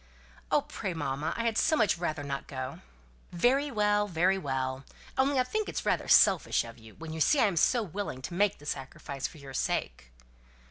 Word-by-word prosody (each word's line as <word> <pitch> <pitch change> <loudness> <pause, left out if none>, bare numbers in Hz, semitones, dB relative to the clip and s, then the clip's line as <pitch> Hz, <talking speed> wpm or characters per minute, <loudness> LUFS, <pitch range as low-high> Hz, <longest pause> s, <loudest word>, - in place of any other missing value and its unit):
"Oh, - - +3
pray, 185 - -5
mamma! 145 0 -2
I 230 - -1
had 225 -1 +1
so 315 - +3
much 215 -8 +3
rather 155 -4 -2
not 140 -1 -4
go!" 130 0 -5 0.5
"Very 260 +11 +2
well! 210 -3 +2
very 185 +2 +2
well! 130 -3 -2 0.3
Only 270 0 +2
I - - +4
think 430 +11 -2
it - - -7
is - - -3
rather - - 0
selfish - - +5
of 115 0 -11
you, 110 -1 -15
when 160 0 -8
you 160 - -4
see 295 - +4
I - - +5
am 200 -4 0
so 235 +7 +3
willing 190 -8 -5
to 170 - -5
make 200 +2 +2
the 145 - -15
sacrifice 135 -1 -4
for - - -14
your 140 -2 -10
sake." - - -2
165 Hz, 205 wpm, -29 LUFS, 135-210 Hz, 0.5 s, selfish